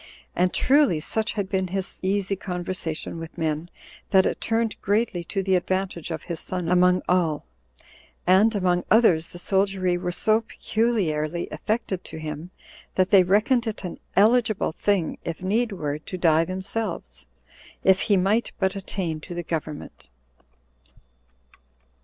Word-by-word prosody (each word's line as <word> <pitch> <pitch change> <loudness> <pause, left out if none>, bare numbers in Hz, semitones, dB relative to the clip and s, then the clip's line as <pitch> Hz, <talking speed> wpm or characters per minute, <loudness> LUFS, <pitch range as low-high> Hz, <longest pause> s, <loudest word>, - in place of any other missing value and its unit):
And 180 +1 +2
truly 275 - +3
such 220 +8 -2
had 200 -3 -2
been 190 -1 -1
his 190 +1 -3
easy 195 +1 0
conversation 180 -3 -4
with 165 +1 -9
men, 160 0 -2 0.4
that 190 -1 +5
it - - -1
turned 225 -1 -1
greatly 205 -3 0
to 195 +3 -2
the 190 0 +1
advantage 185 -2 -1
of 160 -1 -4
his 170 -3 -4
son 180 -2 -3
among 180 0 +4
all; 170 -5 +1 0.8
and, 200 +5 +5
among 180 -2 +1
others, 185 -8 +4
the - - -11
soldiery 190 -1 +1
were 180 - -2
so 215 +5 +2
peculiarly 175 -9 -1
affected 215 -4 -2
to - - -8
him, 155 +2 -6 0.5
that 185 0 +2
they 195 -2 +8
reckoned 215 +6 +2
it 220 -1 -4
an 180 - -6 0.2
eligible 220 0 +3
thing, 190 -1 0
if 170 +2 -5
need 220 +5 +1
were, 150 -6 -3
to 185 +4 -7
die 165 -2 +3
themselves, 190 +5 -4 0.6
if 190 0 +5
he 200 - +5
might 200 +6 +1
but 190 0 0
attain 185 -5 -3
to 175 +2 -8
the 175 - -3
government. 155 - -5
185 Hz, 145 wpm, -24 LUFS, 170-205 Hz, 0.8 s, they